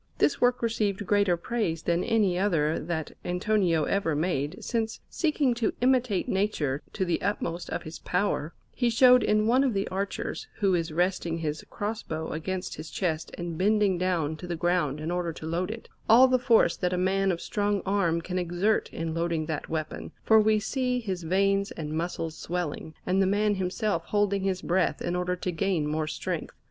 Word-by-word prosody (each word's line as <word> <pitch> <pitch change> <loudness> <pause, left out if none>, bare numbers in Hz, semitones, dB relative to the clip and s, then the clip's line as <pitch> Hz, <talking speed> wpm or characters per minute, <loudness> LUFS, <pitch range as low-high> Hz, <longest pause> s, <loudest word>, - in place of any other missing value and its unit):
This - - +2
work 245 -1 +3
received 210 -3 0
greater 200 -2 +3
praise 170 -4 -2
than 170 +1 +1
any 210 -5 +2
other 165 -5 +1
that 160 -1 -3
Antonio 180 -3 +1
ever 165 -3 0
made, 150 -2 -1
since, 225 -2 -2
seeking 300 -6 +1
to 235 -2 0
imitate 250 -5 +2
nature 160 -9 0
to 190 - -1
the 175 - 0
utmost 175 -3 -2
of - - -3
his 155 +1 -8
power, 180 -4 -1 0.2
he 245 -2 +1
showed 250 +2 +6
in 215 0 +2
one 250 +4 +4
of 255 -6 +1
the 195 +1 0
archers, 195 +2 -3
who 195 -3 +2
is 165 -2 0
resting 175 0 0
his 155 -2 -3
cross 210 +2 -3
bow 160 0 -4
against 180 +4 -4
his 155 +1 -7
chest 165 -4 -2
and 170 -2 -5
bending 205 -2 +3
down 170 -4 0
to 180 - -8
the 175 - -2
ground 170 -4 0
in 155 +2 -3
order 175 -1 -1
to 155 - -9
load 170 +4 -1
it, 225 +1 -7 0.2
all 245 +4 +8
the 255 0 +3
force 240 -2 +4
that 180 -1 -1
a - - 0
man 190 +1 +2
of 170 - -2
strong 205 0 -1
arm 180 -4 +1
can 180 +2 -3
exert 180 +5 0
in 165 0 -3
loading 165 -1 -1
that 155 -2 -4
weapon, 155 -1 -4
for 220 -1 +6
we 215 0 +4
see 250 +3 -1
his 190 -6 -4
veins 195 +4 +1
and 150 -1 -5
muscles 165 -1 -3
swelling, 165 -2 -4
and 185 +2 +2
the 190 - +3
man 205 +2 +2
himself 190 -1 -1
holding 205 -1 +1
his 190 -1 -1
breath 180 0 +1
in 175 - -2
order 180 0 0
to 180 0 -3
gain 175 -2 0
more 155 +1 -1
strength. - - -4
185 Hz, 195 wpm, -27 LUFS, 165-210 Hz, 0.2 s, all